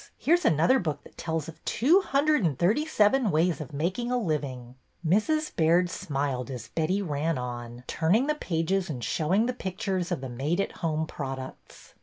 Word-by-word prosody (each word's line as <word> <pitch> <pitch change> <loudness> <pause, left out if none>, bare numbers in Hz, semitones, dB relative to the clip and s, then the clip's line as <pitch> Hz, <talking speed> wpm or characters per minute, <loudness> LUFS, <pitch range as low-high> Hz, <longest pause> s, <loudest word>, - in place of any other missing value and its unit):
Here 330 - +4
's 350 - -2
another 165 - +4
book 150 -5 -3
that - - -16
tells 160 -2 -3
of 165 - -11
two 330 - +4
hundred 300 - +2
and 155 -7 +1
thirty 215 - +2
seven 230 -2 +3
ways 165 0 +1
of 145 - -7
making 185 +12 -2
a 250 - +2
living." 140 - -3 0.3
Mrs. 260 - +1
Baird 170 +2 +3
smiled 140 -6 -2
as 120 -3 -7
Betty 175 +7 0
ran 155 -1 -1
on, 120 -1 -6
turning 180 - +2
the 300 - +1
pages 180 - -1
and 125 -6 -4
showing 175 - +1
the 250 - -1
pictures 190 -4 -3
of - - -1
the 135 - -4
made 140 +9 -2
at 195 - 0
home 160 -2 -1
products. 135 -4 -8
165 Hz, 185 wpm, -27 LUFS, 145-210 Hz, 0.3 s, Here